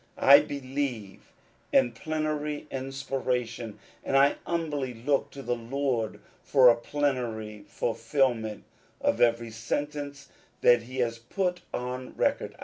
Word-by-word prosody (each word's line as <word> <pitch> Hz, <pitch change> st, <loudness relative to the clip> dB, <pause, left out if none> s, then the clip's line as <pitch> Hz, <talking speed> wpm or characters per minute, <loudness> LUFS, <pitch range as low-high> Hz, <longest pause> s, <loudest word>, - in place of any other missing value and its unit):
I 140 Hz, +1 st, +9 dB
believe 130 Hz, -7 st, -4 dB, 0.4 s
in 120 Hz, -, +4 dB
plenary 150 Hz, +2 st, -3 dB
inspiration, 130 Hz, -4 st, -3 dB, 0.3 s
and 135 Hz, -, +2 dB
I 140 Hz, +1 st, +5 dB
humbly 145 Hz, -7 st, -2 dB
look 135 Hz, +5 st, 0 dB
to 140 Hz, -, -9 dB
the 120 Hz, 0 st, 0 dB
Lord 120 Hz, -1 st, -2 dB, 0.2 s
for 130 Hz, -3 st, +6 dB
a 120 Hz, -, +6 dB
plenary 120 Hz, -6 st, -2 dB
fulfilment 115 Hz, -2 st, 0 dB, 0.4 s
of -, -, +1 dB
every 115 Hz, -1 st, +3 dB
sentence 140 Hz, +5 st, -4 dB, 0.3 s
that 120 Hz, -1 st, +6 dB
he 130 Hz, +4 st, -9 dB
has 115 Hz, -1 st, -1 dB
put 180 Hz, +9 st, -2 dB
on 125 Hz, +1 st, -5 dB
record. -, -, 0 dB
130 Hz, 120 wpm, -28 LUFS, 115-140 Hz, 0.4 s, I